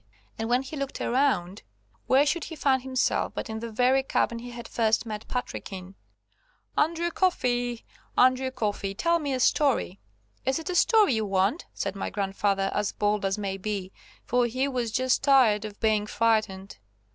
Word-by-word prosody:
And 225 +1 -2
when 250 +2 +2
he 270 +3 -8
looked 275 -2 -4
around, 235 -8 0 0.5
where 270 +2 +5
should 320 +3 0
he 325 - -7
find 270 -3 +2
himself 260 0 0
but - - -4
in 220 - -4
the 230 0 -6
very 255 +4 +3
cabin 235 -3 0
he 245 +1 -8
had 235 -1 -8
first 225 0 +1
met 215 -1 -6
Patrick 250 -4 -4
in. 190 0 -8 0.8
"Andrew 335 +2 +1
Coffey, 245 -10 0 0.3
Andrew 255 +1 +4
Coffey, 205 -6 -3
tell 335 +8 +2
me 290 -3 -3
a 260 - -1
story." 255 -8 +2 0.4
"Is 265 +1 +1
it 325 +3 -4
a - - -3
story 430 - +4
you 220 -1 0
want?" 195 - 0
said 195 0 -3
my 195 - -3
grandfather 195 0 -1
as 210 -1 -1
bold 210 0 0
as 195 +1 0
may 195 -2 -3
be, 195 -1 -4 0.3
for 245 0 +2
he 255 +4 -1
was 245 -4 -2
just 255 +1 +1
tired 250 -7 +4
of 210 -1 -9
being 215 -1 +1
frightened. 210 - 0
235 Hz, 180 wpm, -27 LUFS, 205-265 Hz, 0.8 s, where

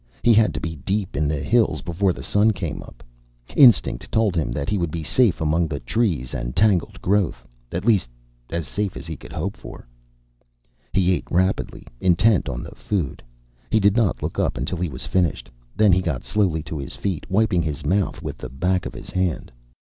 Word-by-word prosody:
He 120 - +6
had 110 0 +4
to - - -2
be 80 -2 -5
deep 95 +6 -2
in 75 +1 +1
the 75 -1 -2
hills 120 -1 +2
before 90 +3 +1
the - - -7
sun 105 +2 +3
came 85 -5 -4
up. - - -14 0.5
Instinct 120 - +5
told 110 -4 +2
him 80 -7 0
that 70 +3 -3
he 105 0 0
would 85 -2 0
be 80 +1 -4
safe 110 - +2
among 80 +2 +1
the 75 -2 -4
trees 75 - -1
and - - -4
tangled 100 -5 +2
growth 100 -1 0 0.2
at 90 +4 -3
least, 100 - +3 0.4
as 85 -2 -3
safe 105 -2 -3
as - - -8
he 80 -1 -5
could - - -13
hope 90 +5 -3
for. - - -11 1.0
He 95 -1 +2
ate - - -3
rapidly, 95 +2 0
intent 95 +3 +3
on 60 0 -4
the - - -9
food. 90 -10 -3 0.5
He 110 - +3
did 100 0 +4
not 115 -6 +1
look - - -3
up - - 0
until 70 +8 -3
he 90 -1 -1
was 65 -2 -6
finished. 90 -3 0 0.2
Then 105 -2 +5
he 95 - +3
got 80 -9 -2
slowly 90 -7 0
to 75 0 -5
his 70 - -5
feet, 95 -6 -3
wiping 100 -2 +2
his 75 -2 -4
mouth 95 +5 0
with - - -5
the - - -6
back 90 +7 0
of - - -9
his - - -9
hand. 90 -3 -1
90 Hz, 205 wpm, -23 LUFS, 80-100 Hz, 1.0 s, He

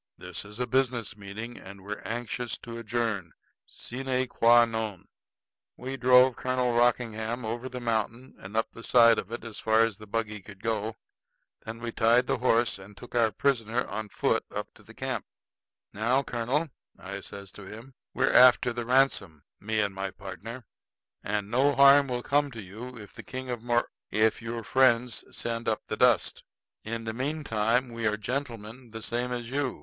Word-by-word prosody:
This 90 +1 -6
is 105 +1 -10
a 125 - 0
business 125 -3 0
meeting, 105 +4 -7
and 100 0 -12
we're 105 +1 -5
anxious 120 +1 -3
to 115 0 -6
adjourn 110 -6 -2 0.3
sine 130 +1 -2
qua 120 0 +6
non." 110 -5 -4 0.7
We 130 +2 -5
drove 125 -1 +6
Colonel 125 -1 0
Rockingham 120 -1 +1
over 120 +3 -4
the 125 0 -6
mountain 115 +2 -2
and 100 +3 -7
up 115 - 0
the 115 - -11
side 115 -1 +6
of 95 - -7
it 120 - -5
as 115 -2 -7
far 110 0 +3
as 115 -2 +1
the 110 - -11
buggy 105 0 -2
could 100 0 -13
go. 110 -1 -1 0.7
Then 110 +1 -6
we 120 -1 -3
tied 120 +2 +4
the - - 0
horse, 120 -3 +2
and 95 +1 -13
took 120 - -12
our 115 -2 +3
prisoner 120 0 0
on 110 -1 -5
foot - - +1
up - - -5
to - - -19
the - - -15
camp. - - -3 0.7
"Now, 120 +6 +1
colonel," 130 +6 -1 0.3
I 100 +1 -7
says 100 0 -8
to 105 - -11
him, 115 +6 -10 0.2
"we're 135 +2 +2
after 125 -1 +7
the 120 -1 -4
ransom, 125 - +2 0.2
me 110 +1 0
and 100 -1 -1
my 95 0 -3
partner; 105 +6 -8 0.6
and 105 0 -2
no 135 +4 +3
harm 140 0 +7
will 125 -1 -3
come 145 0 +2
to 110 -2 -7
you 115 +7 -9
if 105 -2 -11
the - - -9
King 130 0 -6
of 120 -2 -4
Mor 120 0 +1 0.2
if 110 +1 +2
your 115 0 -4
friends 120 +1 +3
send 115 -1 -3
up 110 - -1
the - - -3
dust. 120 -4 +3 0.4
In 115 +1 -4
the 110 0 -3
meantime 125 -3 0
we 115 -1 -2
are 105 0 +1
gentlemen 120 0 -5
the 110 0 -8
same 120 +1 -2
as 120 -1 -4
you. 140 -1 -1
115 Hz, 185 wpm, -28 LUFS, 110-125 Hz, 0.7 s, after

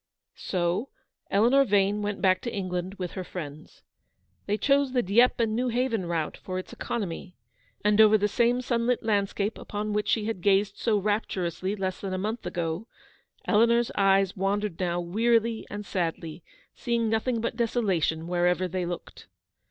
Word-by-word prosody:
"' - - -62 0.2
So 180 +6 0 0.4
Eleanor 240 +7 +4
Yane 205 -3 +2
went 205 0 -3
back 185 -1 +4
to 235 - -4
England 185 -1 -3
with 180 -3 -5
her 185 - -5
friends. 155 -4 -9 0.6
They 205 +1 +1
chose 275 +1 +2
the 250 -2 +2
Dieppe 235 +4 +4
and 220 -1 0
Xew 250 -1 0
haven 230 -6 0
route 165 -2 -2
for 185 -1 -5
its 185 - -6
economy; 185 -5 -4 0.5
and 210 +1 +5
over 215 0 +7
the 205 0 +1
same 240 +4 +2
sunlit 240 -1 0
landscape 205 0 0
upon 210 0 -4
which 210 0 -1
she 215 -2 +1
had 220 -5 -3
gazed 200 +1 +2
so 220 -3 +1
rapturously 195 -2 -1
less 190 -2 -3
than 190 -2 -3
a - - -2
month 215 +1 -3
ago, 175 +3 -3 0.6
Eleanor's 235 +2 +3
eyes 195 -1 +3
wandered 195 -1 -1
now 175 -1 0
wearily 225 +5 +1
and 205 0 -6
sadly, 165 -2 -3 0.3
seeing 235 -1 -1
nothing 225 +2 0
but 230 0 -2
desolation 195 -9 0
wherever 180 +1 +1
they 180 0 -3
looked. 175 0 -7
205 Hz, 165 wpm, -27 LUFS, 185-225 Hz, 0.6 s, over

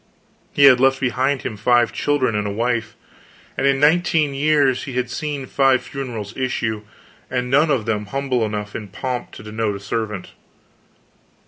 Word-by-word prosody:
He 140 - +2
had 130 -3 +8
left 135 +1 +3
behind 130 +1 0
him 110 - -4
five 120 +2 +3
children 145 -5 0
and 105 0 -1
a - - -2
wife; 115 +1 -1 0.6
and 135 - +1
in 135 0 +2
nineteen 155 -1 +3
years 140 -2 +2
he 135 - -6
had 125 0 -2
seen 145 -1 -4
five 135 -1 +2
funerals 115 -6 -6
issue, 115 -4 -2 0.5
and 125 -1 -2
none 150 +4 +4
of 130 -7 +1
them 105 -2 -2
humble 135 -1 -1
enough 105 -1 -4
in 105 - -5
pomp 125 +5 -4
to - - -10
denote 110 -1 -2
a - - -6
servant. 105 -1 -4
125 Hz, 165 wpm, -21 LUFS, 110-135 Hz, 0.6 s, had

